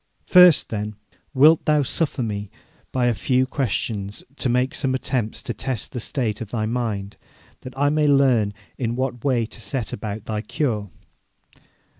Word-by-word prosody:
'First, 180 -4 +7
then, 105 -1 -4 0.4
wilt 150 +4 +6
thou 150 -1 +3
suffer 140 -1 0
me 105 -2 -4 0.4
by 125 -2 +1
a 120 - +3
few 130 +4 +1
questions 105 -6 -3
to 130 - 0
make 125 +4 +1
some 135 -4 0
attempt 125 -4 -2
to 120 - -2
test 125 +2 -4
the 125 - -4
state 115 -3 -2
of 110 - -6
thy 110 -2 -2
mind, 110 -4 -3 0.4
that 130 +1 -10
I 145 +1 +2
may 150 0 +2
learn 130 -8 +3 0.2
in 120 -2 -1
what 125 -2 -3
way 125 -5 +2
to 115 - -11
set 110 +3 -3
about 105 0 -5
thy 110 -1 -2
cure?' 105 -1 -2
120 Hz, 165 wpm, -23 LUFS, 105-135 Hz, 0.4 s, First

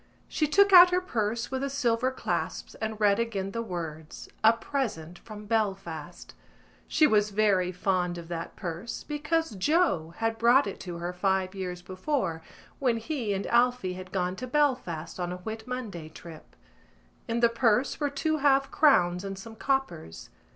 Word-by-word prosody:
She 305 - 0
took 400 +6 +4
out 360 0 +10
her 360 0 +2
purse 230 - -2
with 265 0 -2
the 275 - -1
silver 255 -3 +1
clasps 260 - -3
and 220 -1 -3
read 205 -1 +3
again 200 -4 -2
the 230 - -3
words 160 -6 -6 0.2
A 220 - +8
Present 225 - -4
from 210 -1 -10
Belfast. 195 -7 -3 0.5
She 310 - +4
was 210 -6 +3
very 200 -3 +2
fond 180 -1 -1
of 170 -1 -8
that 165 -1 -6
purse 180 +4 -6
because 310 +2 -1
Joe 195 - +1
had 225 0 -1
brought 240 +4 +5
it 200 - -6
to 175 -2 -6
her 175 +1 -4
five 190 0 0
years 180 -2 -5
before 185 - -2 0.4
when 245 -4 +1
he 230 -2 -3
and 195 - -3
Alphy 240 -5 +2
had 185 0 -9
gone 180 -1 -1
to 255 - -5
Belfast 245 - -1
on 175 0 -2
a 180 - -4
Whit 220 +5 -7
Monday 215 -11 -5
trip. 160 0 -13 0.7
In 230 +1 -1
the 235 - +5
purse 230 +2 +1
were 290 -1 0
two 310 +3 -1
half 275 -1 +3
crowns 180 - +3
and 195 -1 -5
some 220 +3 -10
coppers. 175 - -3
215 Hz, 170 wpm, -28 LUFS, 180-260 Hz, 0.7 s, out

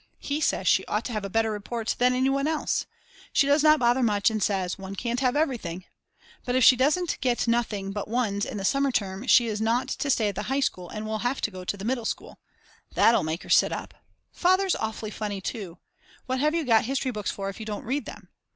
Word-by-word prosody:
_ - - -34
He 290 +2 -3
says - - 0
she - - +4
ought - - -1
to - - -4
have 215 -2 -2
a 200 - -4
better 225 +2 +1
report 220 +2 -3
than 250 +1 +3
any 260 +1 +2
one 275 +1 0
else. 315 -1 -1 0.4
She 280 - +3
does 285 +2 +3
not 305 0 +6
bother 245 0 +2
much 210 -2 +2
and 215 -1 -2
says: 190 -3 0
One 195 0 -7
can't 240 +4 -2
have 255 -1 +1
everything. 225 - -2 0.6
But 245 - -2
if 255 - +3
she 255 - +8
doesn't 300 +8 +1
get 245 -2 0
nothing 215 -4 0
but 205 0 -4
ones 215 -3 -1
in 215 - -4
the 195 - -3
summer 275 +4 +2
term 200 +1 -2
she 245 -2 +6
is 215 -2 -3
not 240 +4 +1
to 280 - -2
stay 220 -5 +2
at - - -4
the 200 - -4
high 270 +1 +1
school 180 -10 -2
and 215 0 -6
will 215 0 -3
have 245 +4 -1
to 220 - -1
go 185 -1 -8
to 205 - -2
the 195 - -7
middle 240 -1 -1
school. - - -5 0.6
That'll 230 +1 +5
make 160 +2 -3
her - - -13
sit - - +5
up. - - -5 0.4
Father's 370 +1 +2
awfully 220 -1 -4
funny 205 -2 -4
too: 190 -3 -6 0.5
What 260 0 -2
have 305 +3 +2
you 330 -2 0
got 225 -3 +4
history 265 +1 -1
books 210 -3 -3
for, 195 -1 -4
if 195 - -9
you 220 - -7
don't 210 -1 -5
read 275 +5 -2
them? - - -10
230 Hz, 245 wpm, -26 LUFS, 205-265 Hz, 0.6 s, she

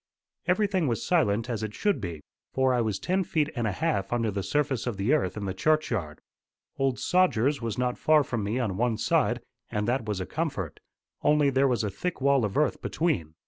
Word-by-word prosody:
Everything 185 -3 +2
was 115 -3 +1
as - - -6
silent 115 - +2
as 115 -4 -3
it 110 -1 -4
should 205 - 0
be, 85 -6 -5 0.3
for 130 -1 +3
I 120 - +2
was 110 -4 -1
ten 185 - 0
feet 155 -3 0
and 120 -3 0
a - - 0
half 100 - -1
under 115 -2 +1
the 100 0 -2
surface 140 +1 -1
of 115 -5 -2
the 100 +9 +1
earth 100 -10 0
in 105 - -3
the 95 - -2
churchyard. 110 - 0 0.6
Old 135 -2 +1
Sogers 145 -7 +2
was 115 -2 -3
not 125 0 -1
far 155 -1 +4
from 120 -5 -3
me 105 +4 -1
on 110 -7 -1
one 120 -1 +1
side, - - +1 0.3
and 105 0 -2
that 120 -1 0
was 105 -3 -2
a 95 - -3
comfort; 140 - -3 0.4
only 150 -2 +3
there 135 +1 +3
was 120 -3 +1
a 105 - -1
thick 180 - -4
wall 140 -1 +3
of 100 - -3
earth 150 - +1
between. 125 - -1
125 Hz, 220 wpm, -27 LUFS, 105-150 Hz, 0.6 s, far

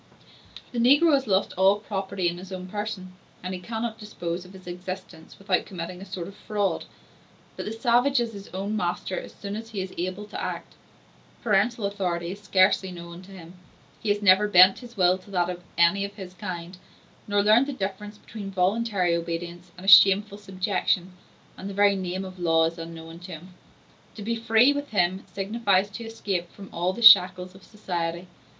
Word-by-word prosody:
The 240 - -3
negro 290 +7 +5
has 270 -2 +2
lost 190 -1 +1
all 190 +2 +5
property 195 -3 -3
in 175 +1 -2
his 185 +1 -11
own 185 -1 -6
person, 205 -2 -5 0.3
and 185 +1 -4
he 185 - -5
cannot 225 +3 -4
dispose 175 -4 -5
of 185 - -14
his 190 -1 -14
existence 180 -2 -8
without 195 -1 0
committing 180 -1 -7
a - - -8
sort 185 -3 -6
of 200 - -10
fraud: 205 -1 -2 0.7
but - - -6
the - - -3
savage 245 +4 +2
is 235 -1 -2
his 200 -1 -9
own 195 +3 -4
master 180 -1 -2
as - - -10
soon 200 0 -7
as 225 +1 -7
he 215 -3 -5
is 185 - -6
able 185 +4 -3
to - - -7
act; - - -5 0.7
parental 215 +1 +1
authority 180 -4 -2
is 200 +2 -9
scarcely 190 -1 +3
known 170 0 -9
to 190 +1 -15
him; 175 -3 -12 0.5
he 215 - -3
has 205 0 +1
never 200 +1 +6
bent 185 -1 +7
his 240 -2 -13
will 185 0 +3
to 185 - -18
that 180 -2 0
of 175 0 -8 0.2
any 170 +4 +4
of 200 0 -6
his 190 -3 -9
kind, 180 0 -7 0.5
nor 205 -1 +2
learned 220 +6 +5
the - - -2
difference 205 -2 -5
between 210 -2 -8
voluntary 190 -1 +1
obedience 170 +1 -5
and 180 - -10
a - - -7
shameful 200 +1 +7
subjection; 190 -2 -1 0.5
and 195 - -6
the 195 - -7
very 200 0 +4
name 185 0 -4
of 185 -1 -10
law 165 -2 +3
is 165 +1 -4
unknown 165 0 -9
to 180 0 -9
him. 175 +4 -11 0.6
To 210 - -8
be 230 +2 -1
free, 230 +4 +4
with 285 0 -4
him, 185 -2 +1
signifies 200 0 0
to 230 +3 -7
escape 195 -6 -4
from 195 -1 -12
all 175 +2 0
the 235 +5 -6
shackles 185 -4 +7
of 190 0 -16
society. 175 -4 -4
190 Hz, 195 wpm, -25 LUFS, 180-210 Hz, 0.7 s, bent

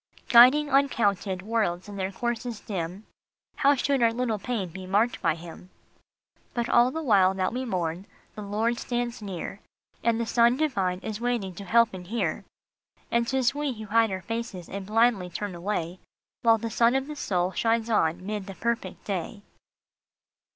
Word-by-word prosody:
" - - -26
Guiding 255 +5 +7
uncounted 210 -9 +1
worlds 205 -5 -1
in 205 - -8
their 190 -1 -2
courses 240 +1 -3
dim, 190 0 -5 0.5
How 285 0 +4
should 275 0 0
our 230 -1 +4
little 230 -2 -1
pain 210 -4 -3
be 185 +2 -9
marked 210 +6 +1
by 165 -2 +2
him?" 170 +2 -11 0.9
But 235 -1 0
all 240 +1 +5
the 320 +5 -4
while 195 -7 +4
that 190 +2 -1
we 255 +1 -3
mourn, 180 -3 -3 0.3
the 210 - -8
Lord 220 +4 -1
stands 240 -1 -3
near, 195 -1 -6 0.4
And 230 0 +2
the 235 - 0
Son 235 +2 +3
divine 195 -12 0
is 215 +1 -5
waiting 235 -6 -1
to 200 +3 -9
help 230 +3 +4
and 180 -1 -8
hear; 195 -4 -2 0.7
And 235 0 +2
t 265 - 0
is 260 -1 +2
we 290 -2 -2
who 220 -2 -8
hide 225 +2 +3
our 190 -1 -4
faces, 225 -5 -5
and 195 0 -6
blindly 220 -4 +2
turn 200 +3 -4
away, 175 -1 -3 0.4
While 230 -2 +5
the 225 +1 -5
Sun 235 +4 +3
of 270 0 0
the 300 +1 -7
soul 180 -9 -1
shines 225 +2 +1
on 180 -5 +1
mid 205 -1 -4
the 195 - -7
perfect 235 -5 -3
day. 200 +1 -4
215 Hz, 180 wpm, -26 LUFS, 190-235 Hz, 0.9 s, Guiding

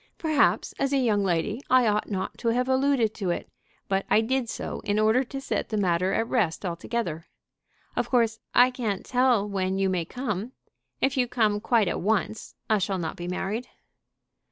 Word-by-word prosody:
Perhaps 310 -4 +2
as 275 0 0
a - - +4
young 220 -6 +2
lady 195 +6 0
I 255 -1 +5
ought 210 -1 +1
not 190 -3 -3
to 235 - -3
have 245 +2 +1
alluded 260 -4 +2
to 190 -3 -3
it, 175 - -2 0.4
but 195 0 0
I 220 - +5
did 250 +1 -1
so - - -4
in 205 0 -1
order 220 +4 +3
to 270 +3 -6
set 270 - -3
the 215 - -1
matter 185 -1 +1
at 225 - 0
rest 205 -7 0
altogether. 170 -1 -3 0.7
Of - - -1
course 230 -3 +2 0.2
I 250 +1 +6
can't 220 -6 -3
tell 250 -5 +2
when 190 -1 -1
you 195 0 +1
may 180 -3 -1
come. 230 +1 -4 0.5
If 270 +1 +1
you 250 -1 +2
come 215 -4 +1
quite 225 -3 +2
at - - -2
once 215 +2 -1
I 215 -1 +3
shall 195 0 -1
not 165 -3 -3
be 175 - -6
married." 200 +6 -3
220 Hz, 190 wpm, -26 LUFS, 195-250 Hz, 0.7 s, I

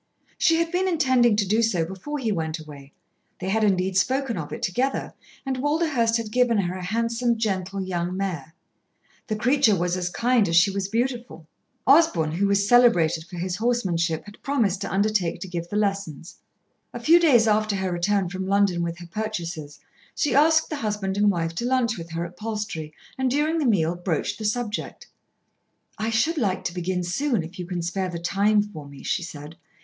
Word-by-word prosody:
She 330 - +4
had 335 0 0
been 370 +1 +1
intending 260 - +3
to 205 -2 +1
do 215 +4 +2
so 185 -8 +1
before 190 - -6
he 235 -6 -1
went 160 -4 -2
away; 145 -3 -12 0.5
they 190 - -3
had 220 +2 +1
indeed 190 -2 +1
spoken 260 +5 +1
of 155 -4 -5
it - - -6
together, 255 +10 -1 0.3
and 265 -1 -2
Walderhurst 290 -6 +1
had 225 -2 -5
given 245 -1 +3
her 180 -3 0
a 185 - -6
handsome, 230 +4 0
gentle 195 -3 -2
young 180 0 -3
mare. 165 -6 -4 0.7
The 215 - -1
creature 240 0 +3
was 175 0 0
as 180 -1 -2
kind 235 +1 +2
as 165 - +1
she 175 +4 +5
was 195 0 -2
beautiful. 235 -5 -3 0.4
Osborn, 265 - +4
who 190 +5 +1
was 200 0 +2
celebrated 175 -10 +4
for 175 +1 -10
his 180 +1 -3
horsemanship, 185 -9 0
had 205 0 -14
promised 225 -9 0
to - - -4
undertake 195 -4 +1
to 190 - -5
give 175 -1 -5
the 205 - -5
lessons. 195 -6 -2 0.6
A - - -4
few 335 +2 +6
days 255 -10 +5
after 215 -1 +2
her 190 -1 -2
return 190 +2 +1
from 185 +1 -5
London 195 -3 +2
with 170 0 -3
her 175 -1 -10
purchases, 170 -7 -5 0.4
she 295 - 0
asked 315 +3 +4
the 305 - -2
husband 210 -5 -2
and 205 +1 +3
wife 165 -3 -1
to 205 +8 -3
lunch 245 -3 +1
with 165 0 -8
her 170 +1 -2
at 175 +1 -10
Palstrey, 210 -8 -4 0.3
and 260 -1 +1
during 300 +5 +1
the 290 - +1
meal 170 -6 +2
broached 175 0 -2
the 215 - -4
subject. 220 0 -3 0.9
"I 220 +1 -1
should 300 +9 +1
like 195 -6 0
to 170 - -3
begin 180 0 -2
soon, 215 - 0
if 175 +4 -10
you 175 - -5
can 175 -2 -3
spare 185 +2 -2
the 175 - -5
time 205 +5 +2
for 160 -9 -10
me," 140 -1 -12
she 180 - -1
said. 155 -1 -9
200 Hz, 195 wpm, -24 LUFS, 175-235 Hz, 0.9 s, few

